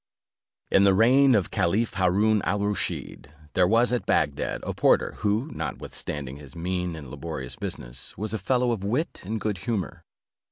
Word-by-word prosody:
In 95 - +6
the 100 -1 +5
reign 130 +5 +6
of 100 -5 +1
Caliph 105 +7 +1
Haroon 100 +3 +3
al 100 0 0
Rusheed, 100 -7 -3 0.3
there 90 -1 +4
was 115 +4 +3
at 125 - -1
Bagdad, 70 -2 0
a - - -3
porter, - - +3
who, 110 +9 0
notwithstanding 70 -2 -5
his 75 +2 -13
mean 90 0 -2
and 70 -6 -9
laborious 75 -7 -6
business, - - -7
was 110 +3 -3
a 110 - -1
fellow 125 +5 +1
of 110 -5 -2
wit 125 +11 -1
and 110 +4 -3
good 105 -2 -2
humour. 105 -3 -3
100 Hz, 165 wpm, -26 LUFS, 85-110 Hz, 0.3 s, In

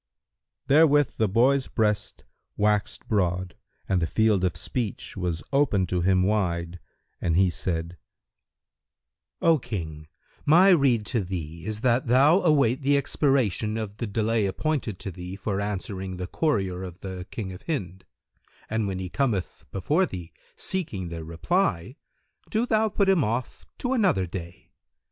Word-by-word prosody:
Therewith 145 0 +4
the 110 -2 +2
boy's 130 +6 +3
breast 105 -1 -1 0.3
waxed 105 0 0
broad 90 -3 0 0.3
and 95 -2 +1
the 80 - +1
field 110 -2 +2
of 90 -3 0
speech 115 +3 -4
was 90 -4 -2
opened 110 - +2
to 90 -1 0
him 95 0 +3
wide 90 -4 -1 0.4
and 85 - +1
he 95 -1 +4
said, 85 0 -3 1.4
"O 165 -2 +5
King, 80 -10 -6 0.4
my 175 +6 +6
rede 135 - +4
to 115 -1 -1
thee 85 -2 -6
is 110 0 -3
that 125 0 +2
thou 140 +10 +5
await 140 -5 +3
the 140 +1 +3
expiration 130 - +1
of 105 -2 -5
the 115 - -3
delay 110 0 +1
appointed 125 -1 -2
to 95 - -5
thee 90 +1 -7
for 100 0 -2
answering 95 -2 -4
the 90 - -4
courier 95 - -1
of 90 -2 -8
the 95 -1 -6
King 95 -5 -5
of 90 - -10
Hind, 95 - -3 0.7
and 110 -1 0
when 95 -1 -3
he 95 0 -4
cometh 105 - -2
before 150 - +1
thee 90 - -8 0.2
seeking 110 - -2
the 85 -1 -6
reply, 95 - -1 0.5
do 220 +2 +1
thou 220 -2 +2
put 200 -1 +1
him 190 -6 +4
off 115 +3 -3
to 250 +1 -1
another 195 - +2
day. 85 0 -8
105 Hz, 150 wpm, -26 LUFS, 90-135 Hz, 1.4 s, my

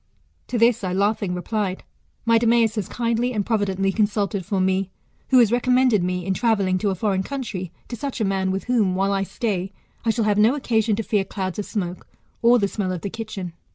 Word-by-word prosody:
To 245 - -2
this 230 -1 +3
I 185 -1 -1
laughing 200 -1 0
replied, 190 +1 -2 0.4
My 230 -1 +5
Demeas 230 -1 +3
has 210 -5 -3
kindly 235 +1 0
and 205 -3 -1
providently 195 -3 0
consulted 205 -1 0
for 195 +2 -1
me, 190 0 +1 0.4
who 260 - +5
has 235 -4 +6
recommended 250 -4 +3
me, 180 0 -2
in 190 - 0
travelling 195 -3 +1
to 205 - 0
a 190 - -1
foreign 195 0 0
country, 210 -8 -5 0.2
to 240 - -5
such 270 +2 -5
a 220 - +1
man, 190 -1 0
with 190 +1 -2
whom, 220 -7 +1
while 195 +1 +1
I 195 - +1
stay, 195 -2 -2 0.3
I 230 - 0
shall 225 -1 +1
have 210 -1 +2
no 225 +6 +5
occasion 225 -6 +1
to 225 - -2
fear 210 -2 +1
clouds 190 -1 -4
of 205 - -2
smoke, 180 -4 -4 0.3
or 235 +1 +6
the 200 -4 +1
smell 195 -2 -2
of 180 -2 -4
the 200 - -4
kitchen. 215 -6 -6
205 Hz, 215 wpm, -23 LUFS, 190-230 Hz, 0.4 s, has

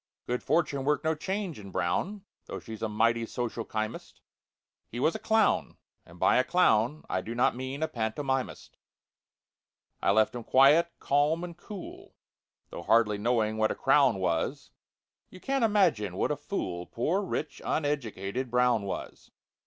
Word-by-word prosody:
Good 125 0 -2
fortune 145 -5 0
worked 145 0 +1
no 160 0 +2
change 190 - -4
in 100 -1 -10
BROWN, 190 - -2 0.2
Though - - -5
she's 110 -2 -9
a 110 - -1
mighty 115 +2 +2
social 120 -1 -3
chymist; 110 +1 -5 0.7
He 120 - -7
was 155 +5 +2
a - - -5
clown—and 220 - -1
by - - +4
a 125 - +4
clown 145 -4 +2
I 95 - -1
do 115 +4 -6
not 120 0 +2
mean 130 +4 -4
a - - +1
pantomimist. 130 +3 -3 1.2
It - - +1
left 110 +2 +3
him 120 -1 -6
quiet, 145 +8 +5
calm, 150 +4 +1
and 175 -1 -6
cool, 195 +2 -10 0.6
Though - - -6
hardly 105 +1 +3
knowing 110 -1 +1
what 110 0 +2
a - - -2
crown 135 -5 +4
was— 85 -3 -2 0.6
You 185 - -13
can't 270 +4 -1
imagine 190 - +2
what - - +1
a - - +1
fool 95 - -4
Poor 165 - 0
rich 195 - -4
uneducated 130 -5 -2
BROWN 125 -2 +3
was! 100 - -6
125 Hz, 155 wpm, -29 LUFS, 110-160 Hz, 1.2 s, quiet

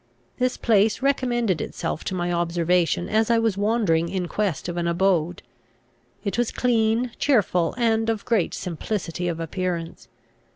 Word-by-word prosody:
This 250 0 +1
place 220 +1 +2
recommended 240 - +1
itself - - -4
to 190 - -2
my 175 -1 -1
observation 175 0 +1
as 220 +1 +1
I 235 - +4
was 225 -3 +1
wandering 200 -6 +1
in 185 -1 -2
quest 195 -6 -2
of 175 - -4
an 170 -1 -1
abode. 175 -1 +1 0.8
It 200 +3 -2
was 240 - +1
clean, 235 0 +1
cheerful, 190 - +2
and 225 -2 +1
of 220 -2 -2
great 220 -8 +1
simplicity 180 0 -3
of 170 -1 -2
appearance. 165 -4 -4
195 Hz, 150 wpm, -24 LUFS, 170-225 Hz, 0.8 s, I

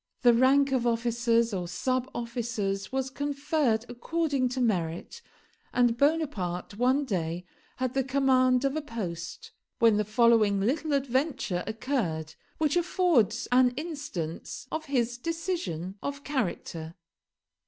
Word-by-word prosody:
The 240 -1 +7
rank 270 +3 +4
of 250 -2 +1
officers 235 -1 +1
or 180 -2 -2
sub 255 +8 -1
officers 225 -5 -3
was 265 0 -1
conferred 285 -4 0
according 275 +1 -1
to 255 +1 -3
merit; 185 - -1 0.5
and 245 -2 +4
Bonaparte 235 - 0
one 260 +4 +3
day 175 -5 -2 0.3
had 255 -1 -2
the 270 - +1
command 260 -1 +3
of 275 +1 0
a 310 - -1
post, 185 - -6 0.3
when 225 -2 +5
the 210 - +2
following 215 -2 +4
little 290 +9 0
adventure 265 - 0
occurred, 215 - -2 0.2
which 305 -1 +1
affords 335 - +2
an 250 0 +4
instance 290 - -5
of 315 0 -3
his 245 -4 0
decision 245 - -3
of 280 0 -4
character. 170 - -3
245 Hz, 125 wpm, -28 LUFS, 210-280 Hz, 0.5 s, The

